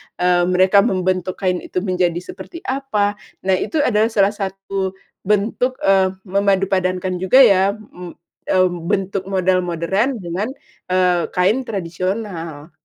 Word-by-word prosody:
eee, 180 0 +2
mereka 185 +2 +4
membentuk 185 -3 0
kain 180 -1 +1
itu 180 - -4
menjadi 180 -3 0
seperti 265 - -10
apa. 215 - -1 0.2
Nah, 190 -1 +2
itu 305 -3 0
adalah 215 -3 +3
salah 205 -3 +2
satu 195 -1 -4 0.3
bentuk, 215 +5 +1
eee, 190 -1 +3
memadupadankan 185 -2 0
juga 190 +9 +6
ya, 200 -3 +4
mmm, 180 -5 -11 0.3
eee, 185 -1 +3 0.2
bentuk 195 0 -1
model 185 -1 +2
modern 180 +9 -1
dengan, 180 +6 -3 0.4
eee, 180 -1 +2
kain 215 +9 +2
tradisional. 175 -4 -4
190 Hz, 125 wpm, -19 LUFS, 180-205 Hz, 0.4 s, juga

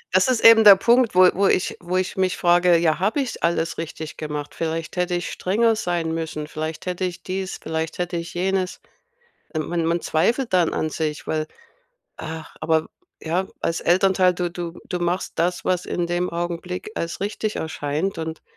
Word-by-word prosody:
Das 185 - +5
ist 255 -3 +1
eben 225 -1 +9
der 205 -2 +10
Punkt, 235 +2 +3
wo 185 0 +8
wo 195 +2 +2
ich 185 - +1
wo 180 +1 -2
ich 185 +2 -1
mich 185 -1 +1
frage, 175 0 +4
ja, 165 -2 +1
habe 210 +9 +1
ich 265 -4 -3
alles 165 -1 0
richtig 160 -1 -6
gemacht? 150 -1 -5
Vielleicht 165 +1 -3
hätte 180 0 0
ich 175 - -3
strenger 225 +4 +1
sein 175 -6 -1
müssen, 160 -2 -4
vielleicht 155 +1 -5
hätte 180 0 -3
ich 180 -2 -3
dies, 190 0 -4
vielleicht 160 0 -3
hätte 175 0 -2
ich 170 +1 -6
jenes. 185 +1 -1 0.8
Äh, - - +1
man 165 +1 -1
man 170 0 +1
zweifelt 235 - 0
dann 175 -3 +3
an 155 - -2
sich, 155 -1 -3
weil 155 -1 -2 0.7
ach, 160 -1 -7
aber, 160 -1 +1 0.3
ja, 175 +4 -1
als 165 - -1
Elternteil, 185 0 +3
du 175 0 -2
du 175 -1 -6
du 180 - -3
machst 175 +2 -2
das, 175 +2 0
was 180 -1 0
in 175 -1 -1
dem 175 +1 -1
Augenblick 175 +3 -4
als 170 0 -4
richtig 210 +1 -2
erscheint 160 +4 -2
und 160 0 -5
175 Hz, 185 wpm, -23 LUFS, 160-185 Hz, 0.8 s, der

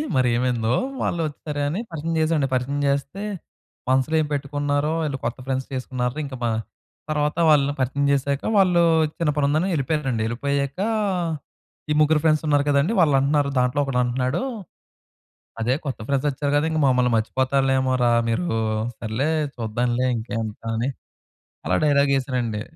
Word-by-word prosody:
మరేమైందో? 120 -2 +1 0.3
వాళ్ళోచ్చేసారుగాని 150 0 -2
పరిచయం 165 +1 -3
చేశామండి. 155 -3 +1
పరిచయం 130 +3 -1
చేస్తే, 140 +7 -1 0.7
మనసులో 130 +4 +2
ఏమి 150 - -3
పెట్టుకున్నారో 145 +1 -1
ఈళ్ళు 140 -3 -2
కొత్త 120 +2 -2
ఫ్రెండ్స్ 130 0 -2
చేసుకున్నార్రా 125 +1 -3
ఇంక 135 -2 -7
మ - - +2 0.6
తర్వాత 150 +1 0
వాళ్ళని 145 -1 +4
పరిచయం 135 +2 0
చేసాక 140 0 0 0.2
వాళ్ళు 180 -3 +4 0.4
చిన్న 165 -3 +1
పనుందని 150 +6 +2
యెళ్ళిపోయారండి. 135 -5 -1
యెళ్ళిపోయాకా, 140 - -1 1.0
ఈ - - +4
ముగ్గురు 155 0 +4
ఫ్రెండ్సున్నారు 155 -2 +3
కదండీ. 145 +8 +2
వాళ్ళంటున్నారు, 145 -2 +3
దాంట్లో 125 +2 +1
ఒకడంటున్నాడు. 125 +2 0 1.2
"అదే 120 +3 +2
కొత్త 135 -5 -4
ఫ్రెండ్స్ 140 +1 +1
వచ్చారు 140 +1 -2
కదా! 145 - +1
ఇంక 160 - 0
మమ్మల్ని 125 -1 +3
మర్చిపోతారులేమోరా 130 +1 +1 0.2
మీరూ. 115 +2 0 0.4
సర్లే 115 +7 -1 0.3
చూద్దాంలే 120 +2 -1
ఇంకేంత" 110 -1 -4 0.2
అని, 120 +4 0 0.8
అలా - - +2
డైలాగ్ 140 -1 +3
యేసారండి. 125 -5 -2
140 Hz, 125 wpm, -23 LUFS, 125-150 Hz, 1.2 s, వాళ్ళని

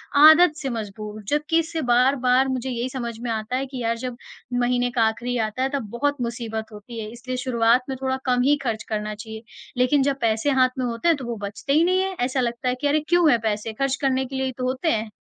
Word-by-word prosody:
आदत 315 +3 +8
से 270 - -2
मजबूर 215 -2 -6
जबकि 300 +4 +1
इससे 325 0 -2
बार-बार 255 +1 +4
मुझे 260 0 -2
यही 245 0 -2
समझ 235 -3 -3
में 240 - -3
आता 220 +3 -2
है 270 - -1
कि 260 -2 -7
यार 230 0 0
जब 250 0 -5 0.4
महीने 245 0 +1
का 240 -2 +2
आख़िरी 240 +3 -1
आता 220 +3 -1
है 265 - +1
तब 255 -7 -3
बहुत 285 +4 0
मुसीबत 230 -2 -4
होती 225 +3 -9
है, 215 - -5
इसलिए 250 +2 -6
शुरुआत 240 -1 +2
में 265 - -2
थोड़ा 260 0 0
कम 250 -1 +2
ही 290 +2 +4
ख़र्च 220 -4 -2
करना 215 -1 -3
चाहिए। 220 +1 -9 0.3
लेक़िन 255 +3 +3
जब 275 0 0
पैसे 225 +4 +1
हाथ 255 0 +5
में 255 - 0
होते 235 +6 -2
हैं 330 -3 +4
तो 265 - -7
वो 235 -2 -4
बचते 210 +7 -3
ही 310 +3 +5
नहीं 370 +2 +3
है। 385 0 -1
ऐसा 260 +1 -1
लगता 240 +1 -1
है 250 - 0
कि 290 - +2
अरे! 300 +2 +3
क्यों 345 -2 +5
हैं 235 - +3
पैसे? 215 +1 -2
ख़र्च 275 +3 0
करने 265 -1 +1
के 265 +1 -8
लिए 265 0 -1
ही 260 - -1
तो 255 - -4
होते 260 +6 0
हैं। 220 -3 -1
250 Hz, 250 wpm, -23 LUFS, 230-270 Hz, 0.4 s, आदत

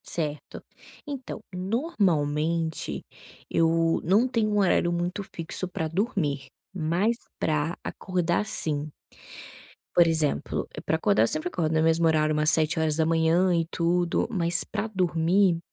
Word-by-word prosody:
Certo. 150 -3 -5 0.4
Então 265 -5 -6
normalmente 170 - -1 0.5
eu 165 0 +2
não 205 +9 +3
tenho 225 -4 0
um 210 - +1
horário 175 -2 +2
muito 175 +3 -2
fixo 170 +2 -3
para 165 -3 -3
dormir, 160 - -1 0.3
mas 180 +6 0 0.2
para 155 +2 0
acordar 180 +1 -1
sim. 155 -7 -3 1.0
Por 170 -1 +6
exemplo, 160 -3 0 0.2
para - - +1
acordar 105 +2 +3
eu - - +3
sempre 155 +7 -1
acordo 160 -3 -1
no 160 - +3
mesmo 165 +1 +3
horário 155 -1 +2
umas 150 0 +3
7h 160 +3 +2
e 165 -1 +1
tudo, 175 0 +1
mas 175 -4 +1
para 215 0 -3
dormir 180 -2 +2
165 Hz, 125 wpm, -26 LUFS, 160-185 Hz, 1.0 s, Por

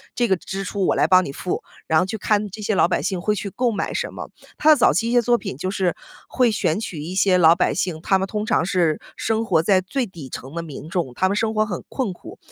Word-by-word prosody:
这 240 - +1
个 190 - +3
支 195 +3 -5
出 195 0 -2
我 - - +2
来 - - +3
帮 185 -1 +5
你 135 - -5
付， 180 +5 -4 0.2
然 160 - +4
后 180 - +2
去 220 +3 -4
看 210 0 +1
这 215 +3 -8
些 210 0 0
老 170 - +4
百 - - 0
姓 185 -2 -2
会 210 +2 +1
去 200 0 -4
购 245 +3 0
买 200 - -2
什 - - -3
么。 - - -7 0.3
他 310 - +3
的 310 - +9
早 250 - +4
期 225 +7 0
一 - - -1
些 245 - +5
作 240 +1 +3
品 195 - -6
就 185 +5 -3
是 185 -4 0 0.3
会 250 -3 +2
选 170 -4 0
取 180 -8 -5
一 170 +5 -6
些 190 -1 +4
老 165 0 +7
百 180 - +1
姓， 170 -3 -2
他 190 +2 +2
们 190 - -2
通 210 +1 -3
常 - - +2
是 170 -4 +1
生 225 0 -1
活 165 -6 +2
在 190 +1 +3
最 245 +7 -2
底 165 -9 -10
层 130 +3 -8
的 170 - -3
民 155 -1 -9
众， 170 -8 -2
他 185 - +2
们 200 - 0
生 220 +1 0
活 215 - +2
很 180 -6 -5
困 245 -9 -2
苦。 - - -12
190 Hz, 300 characters per minute, -22 LUFS, 175-215 Hz, 0.3 s, 的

